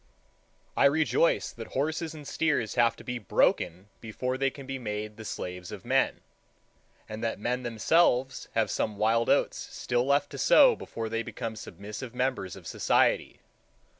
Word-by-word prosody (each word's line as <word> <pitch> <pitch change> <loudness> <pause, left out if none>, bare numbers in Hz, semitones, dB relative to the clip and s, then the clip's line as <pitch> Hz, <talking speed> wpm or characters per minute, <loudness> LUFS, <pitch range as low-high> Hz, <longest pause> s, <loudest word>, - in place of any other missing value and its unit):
I - - +4
rejoice 160 +3 +3
that 115 -1 -10
horses 160 +3 -1
and 150 -2 -10
steers 150 -9 0
have 115 -1 +3
to - - -13
be 125 0 -4
broken 90 -2 +1
before 125 +3 -3
they 135 +1 +1
can 135 0 -11
be 135 0 -5
made 105 -2 -4
the 110 - -9
slaves 90 -4 -6
of - - -9
men, - - +1 0.9
and 110 +2 -7
that 115 - -1
men 125 +4 -1
themselves 125 +3 +2
have 115 -1 +2
some 105 -2 -1
wild 115 +2 +2
oats - - +2
still 120 -1 -2
left 140 +1 +2
to - - -7
sow - - +6
before 115 -1 -6
they 115 +1 -2
become 115 -1 -5
submissive 105 +5 -8
members 125 -8 -1
of - - -13
society. - - +1
120 Hz, 165 wpm, -28 LUFS, 110-135 Hz, 0.9 s, sow